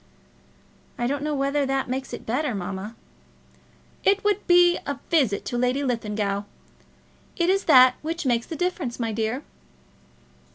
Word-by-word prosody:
"I 240 - -1
don't 280 +3 -1
know 300 0 -1
whether 280 +1 0
that 270 0 -1
makes 260 +2 -4
it - - -7
better, 250 +1 -1
mamma." 195 +4 -5 1.1
"It 400 +1 +3
would 415 -1 +2
just - - -27
be 350 0 +5
a 285 -1 -3
visit 265 -12 +2
to 240 - -2
Lady 250 +3 +1
Linlithgow. 210 -5 -1 1.0
It 345 0 +2
is 390 +1 0
that 255 -4 +7
which 330 +1 -4
makes 240 -2 +1
the 325 - -5
difference, 345 -9 -2
my 230 -2 -1
dear." 225 +5 -2
270 Hz, 155 wpm, -24 LUFS, 235-320 Hz, 1.1 s, that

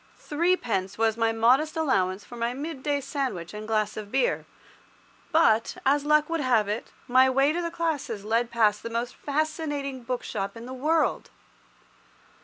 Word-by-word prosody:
Threepence 295 - 0
was 225 -1 +2
my 225 0 +2
modest 255 +9 +3
allowance 200 -10 +1
for 240 - -11
my 235 +1 -2
midday 285 -1 -2
sandwich 255 - -3
and 210 0 -7
glass 215 -1 0
of 210 -1 -7
beer; - - +1 0.8
but, 230 -9 +3
as 285 +2 +3
luck 300 0 +4
would 330 0 -1
have 235 -6 +2
it, 210 +3 -4 0.2
my 260 +1 +5
way 270 +3 +3
to 350 - -1
the 340 - -2
classes 315 -11 -3
led 230 +2 +1
past 215 -3 +2
the 230 - -5
most 235 +2 -3
fascinating 290 -2 -2
bookshop 230 -4 -4
in 230 - -8
the 255 - -7
world. 310 +5 0
255 Hz, 160 wpm, -26 LUFS, 225-300 Hz, 0.8 s, my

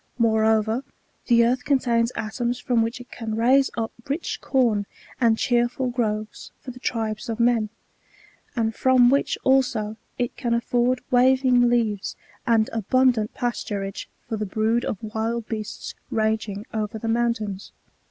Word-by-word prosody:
Moreover, 220 +1 +2 0.4
the 235 -1 +5
earth 250 +2 +1
contains 240 -4 +2
atoms 235 +3 -2
from 245 -2 +1
which 230 +2 -2
it 245 - -13
can 225 -2 -4
raise 260 +4 +4
up 225 -1 -2 0.2
rich 285 +5 -3
com 230 -7 +1 0.3
and 230 -2 +3
cheerful 245 +1 +1
groves 215 -3 -3
for 255 - -8
the 250 - -12
tribes 225 -3 -3
of 225 0 -3
men; 235 -2 +2 0.9
and 225 -2 0
from 255 -1 +4
which 280 - +1
also 245 -5 +2 0.2
it 245 -1 -2
can 235 -3 0
afford 245 +1 +1
waving 255 -1 +4
leaves 220 -4 0 0.3
and 225 -2 +4
abundant 230 0 +2
pasturage 205 -5 -3 0.2
for 225 -2 -3
the 215 - -2
brood 220 +4 +1
of - - -2
wild 220 +1 -2
beasts 215 -2 -5 0.2
ranging 220 -2 -1
over 215 0 -2
the 225 - -5
mountains. 225 -4 -1
230 Hz, 145 wpm, -24 LUFS, 220-245 Hz, 0.9 s, the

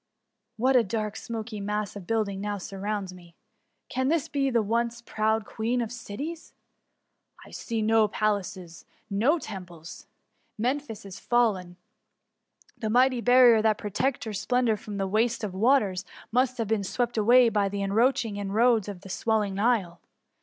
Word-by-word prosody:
What 260 +4 +2
a 245 - +6
dark, 215 0 -3
smoky 220 -2 -6
mass 210 0 -3
of 190 -4 -9
buildings 210 -4 -1
now 205 0 -2
surrounds 195 0 -4
me! 175 -2 -16 0.5
Can 260 0 -1
this 320 0 +1
be 275 -3 0
the 235 -3 +2
once 235 +2 -1
proud 220 -1 -1
Queen 230 +4 -2
of 235 -2 -2
Cities? 245 +8 -7 0.9
I - - -15
see 225 -2 -3
no 220 0 +4
palaces, 200 -5 -3 0.3
no 235 +12 +3
temples 180 - -9 0.3
— - - -45
Memphis 255 -6 -3
is 190 -1 -9
fallen. 200 -8 0 1.0
The 220 - -4
mighty 250 +2 +3
barrier 245 -2 +6
that 215 -1 +2
protected 250 +6 -1
her 220 - -5
splendour 235 +3 +1
from 205 0 -7
the 195 - -1
waste 225 +3 0
of 200 -3 -3
waters, 205 -3 +2 0.3
must 255 +1 +1
have 230 -3 -2
been 215 -1 0
swept 240 +5 -2
away 235 +3 +5
by 205 -3 +1
the 200 0 -3
encroaching 225 +1 +1
in 200 -1 -4
roads 230 -2 +3
of 190 -3 -8
the 195 - -12
swelling 210 0 0
Nile. 200 -5 0
220 Hz, 160 wpm, -27 LUFS, 200-240 Hz, 1.0 s, a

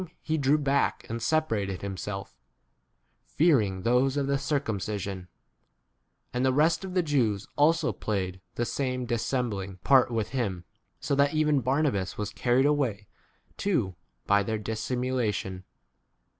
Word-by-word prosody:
tie 160 - +1
drew 145 0 +3
back 140 -1 0
and 115 0 -3
separated 110 - 0
him 100 -1 -3
self, 100 0 -6 0.9
fearing 110 - +2
those 130 +3 +2
of 140 - +1
[the] 140 0 0
circum 140 -7 -1
5 - - -4
cision; 95 -2 -5 1.1
and 125 +1 0
the 130 - +4
rest 155 +7 +2
of 190 -1 -6
the 180 - +3
Jews 115 -10 +1
also 160 +2 +3
played 95 -3 -3
the 120 - 0
same 125 -1 -2
dissembling 115 -5 -2
part 130 -3 +5
with 115 -3 -1
him; 100 -10 -2 0.3
so 140 - -2
that 140 +2 +3
even 150 -2 +3
Barnabas 130 - 0
was 105 -1 -3
carried 125 +2 +2
away 130 -9 +1 0.5
too 180 - +1
1 90 - -14 0.3
by 100 0 +4
their 110 +2 -1
dissimulation. 110 -3 -2
125 Hz, 145 wpm, -28 LUFS, 100-140 Hz, 1.1 s, part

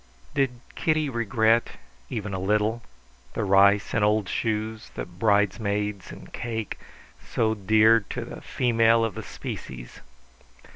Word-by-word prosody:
Did 130 -4 0
Kitty 155 -2 0
regret, 115 0 +2 0.4
even 105 -2 -4
a 95 - -2
little, 105 +4 +1 0.5
the 115 - -1
rice 100 +1 +4
and 115 - +2
old 105 -1 +2
shoes, 110 +2 -2
the - - -4
bridesmaids 100 +1 0
and - - -12
cake, 115 -3 -4 0.4
so 110 -1 0
dear 110 +2 +4
to - - -4
the - - -9
female 115 -2 +3
of 110 - -3
the - - -6
species? 60 -2 -8
110 Hz, 130 wpm, -25 LUFS, 100-115 Hz, 0.5 s, rice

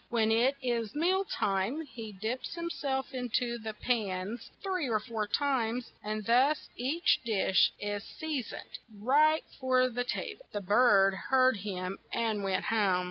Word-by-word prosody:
When 225 -2 +2
it 245 +5 +3
is 235 -3 -1
meal 370 +5 +2
time, 215 - -1
he 225 -6 -8
dips 220 - -4
him 340 0 -3
self 265 -3 -2
in 250 -1 -3
to 240 -1 0
the 220 -1 -6
pans 210 -1 -2
three 370 -8 -1
or 220 -2 +2
four 215 -1 -3
times, 250 -1 0
and 215 0 -3
thus 260 +7 +3
each 280 +8 +2
dish 205 -5 +3
is 205 -1 -3
sea 310 -4 -3
soned 230 - -9 0.2
right 300 +8 +4 0.2
for 255 -1 +3
the 245 0 -2
ta - - -2 0.2
ble." - - -18
The 205 - -2
bird 200 -1 +5 0.2
heard 260 -2 +4
him, 185 -1 -4
and 220 -3 -1
went 190 -1 0
home. 200 -5 +2
235 Hz, 165 wpm, -31 LUFS, 210-265 Hz, 0.2 s, bird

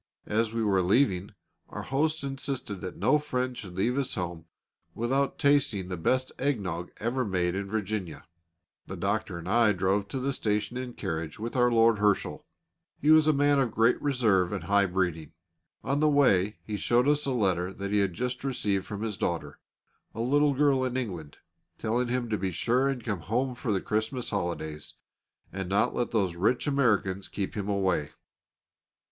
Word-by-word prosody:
As 110 +1 0
we 115 0 -1
were 100 -3 +3
leaving, 100 -1 +1 0.3
our - - -6
host 155 +3 0
insisted 135 -7 -4
that 90 -2 -6
no 150 - +3
friend 130 -4 -2
should 95 -6 -8
leave 120 +7 0
his 135 -2 -1
house 85 -3 -4 0.5
without 135 +4 0
tasting 130 -10 +2
the 90 - -2
best 130 +10 0
egg 140 -3 +1
nog 90 -2 -4
ever 125 +4 -1
made 90 -5 0
in 100 +1 -3
Virginia. 100 -5 -3 0.6
The 95 - -6
doctor 100 0 -1
and 85 +1 -8
I 115 +1 +4
drove 95 +2 0
to 130 +6 -4
the 135 +2 -1
station 105 -1 -1
in 125 0 -4
a - - -11
carriage 80 -3 -4
with 115 +3 -5
Lord 115 -3 +4
Herschel. 105 -1 0 0.5
He 150 - +3
was 155 -1 +6
a - - +6
man 145 -1 +3
of 130 -3 +2
great 115 +2 +2
reserve 110 -11 +2
and 100 -5 -3
high 100 +2 +3
breeding. 90 -5 -2 0.5
On 140 +3 0
the 155 0 +4
way 105 -9 +3
he 105 -1 -4
showed 120 +5 +2
us 150 0 +2
a - - +1
letter 95 -7 +1
that 100 +1 -5
he 105 - +3
had 100 -3 +1
just 125 +3 -3
received 105 -8 -1
from 105 0 -5
his 105 -4 -4
daughter, 85 -1 -2 0.6
a 115 - -3
little 145 +3 +3
girl 140 -2 +3
in 130 0 -1
England, 90 - -5 0.4
telling 120 +3 0
him 120 0 -1
to 105 - 0
be 95 0 -1
sure 125 +9 +1
and 135 -4 -2
come 100 -5 -2
home 125 +9 -1
for 120 -2 -3
the 100 - +1
Christmas 110 +4 -2
holidays, 85 -6 -4 0.6
and 95 -1 -4
not 100 +1 +2
to - - -7
let 120 - 0
those 95 -6 0
rich 105 +8 +1
Americans 105 -9 +1
keep 100 -2 -4
him 105 -1 -3
away. 95 -7 0
110 Hz, 190 wpm, -28 LUFS, 95-130 Hz, 0.6 s, was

